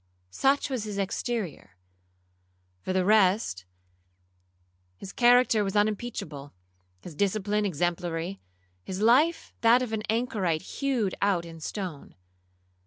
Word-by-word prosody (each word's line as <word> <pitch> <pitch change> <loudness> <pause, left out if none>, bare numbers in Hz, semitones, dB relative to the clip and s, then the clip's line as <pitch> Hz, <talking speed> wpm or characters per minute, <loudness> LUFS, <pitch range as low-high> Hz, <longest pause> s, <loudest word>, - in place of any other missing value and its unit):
Such 275 - +1
was 245 -5 -2
his 205 -2 -5
exterior:—for 90 - -7
the 185 -1 +1
rest, 195 - +3 1.3
his 195 - -9
character 245 -3 +4
was 195 0 -3
unimpeachable, 205 -9 -2 0.5
his 170 - -10
discipline 205 +3 0
exemplary, 175 +1 -2 0.4
his 185 - -5
life 280 +10 +3
that 235 +2 +5
of 230 -3 -5
an 220 - -1
Anchorite 210 -8 0 0.2
hewed 255 -9 0
out 195 -4 +1
in 165 -1 -10
stone. 175 -2 -6
195 Hz, 105 wpm, -27 LUFS, 155-225 Hz, 1.3 s, that